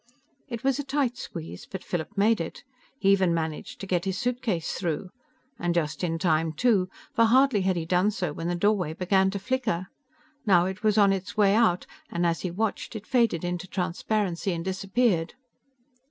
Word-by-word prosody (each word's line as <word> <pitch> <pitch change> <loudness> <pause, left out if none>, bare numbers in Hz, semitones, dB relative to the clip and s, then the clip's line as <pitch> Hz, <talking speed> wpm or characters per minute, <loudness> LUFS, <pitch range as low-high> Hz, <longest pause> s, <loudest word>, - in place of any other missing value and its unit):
It 235 -2 -6
was 270 0 +1
a - - -1
tight 270 -3 0
squeeze, 165 -9 -8
but 190 - -6
Philip 175 +4 -4
made 215 0 +3
it. 165 - -6 0.3
He 195 -6 +3
even 185 -3 +3
managed 160 -2 -4
to - - -4
get 180 -1 0
his 190 -1 -1
suitcase 240 -9 -1
through. 175 +1 -3 0.5
And 175 0 0
just 155 0 -1
in 165 -2 0
time 160 -2 +1
too, 195 0 +2 0.2
for 230 - +4
hardly 255 -2 +4
had 190 0 +1
he 165 -2 -2
done 180 +4 +3
so 180 -7 -2
when 165 +2 -4
the 175 - 0
doorway 185 -3 +1
began 190 +2 +2
to 200 - -3
flicker. 210 -5 -1 0.5
Now 180 -6 +4
it 190 +2 -4
was 215 -1 +2
on 200 -2 +6
its 195 +1 -5
way 200 -2 +5
out, 215 -5 +3 0.2
and 170 0 -1
as 165 -1 +1
he 185 - -2
watched, 220 +5 -2
it 220 -1 -6
faded 230 -10 +2
into 175 +1 -3
transparency 185 0 -1
and 165 0 -4
disappeared. 190 -1 0
190 Hz, 190 wpm, -27 LUFS, 175-215 Hz, 0.5 s, on